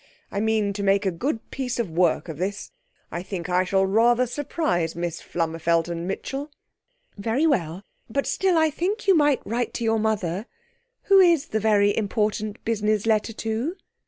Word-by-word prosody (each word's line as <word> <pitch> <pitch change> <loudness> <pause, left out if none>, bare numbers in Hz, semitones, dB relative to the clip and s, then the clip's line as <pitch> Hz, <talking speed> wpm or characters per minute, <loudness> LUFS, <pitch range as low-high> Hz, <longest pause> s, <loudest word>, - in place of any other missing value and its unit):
I 200 - -2
mean 215 -1 +1
to 200 - -4
make 200 0 +2
a 190 - +2
good 225 - -3
piece 260 -2 -3
of 225 -8 -2
work 170 +1 +2
of 160 -2 -7
this. 195 +3 -3 0.4
I 170 - -3
think 180 -2 -5
I 180 +1 +3
shall 190 +1 +2
rather 235 +5 +3
surprise 250 - -1
Miss 170 -1 -3
Flummerfelt 165 0 0
and 170 0 -4
Mitchell.' 275 +9 -4 0.7
'Very 230 +9 +1
well; 185 - 0 0.3
but 275 +5 -1
still 375 -3 +1
I 315 -1 +3
think 380 +9 -2
you 385 - +6
might 295 -4 +3
write 235 +2 -2
to - - -3
your 225 0 +2
mother. 210 -1 -1 0.6
Who 390 -1 +6
is 340 -6 +4
the 220 - 0
very 205 -1 +3
important 210 0 -1
business 215 -2 0
letter 220 0 +1
to?' 225 - -3
215 Hz, 175 wpm, -24 LUFS, 185-250 Hz, 0.7 s, you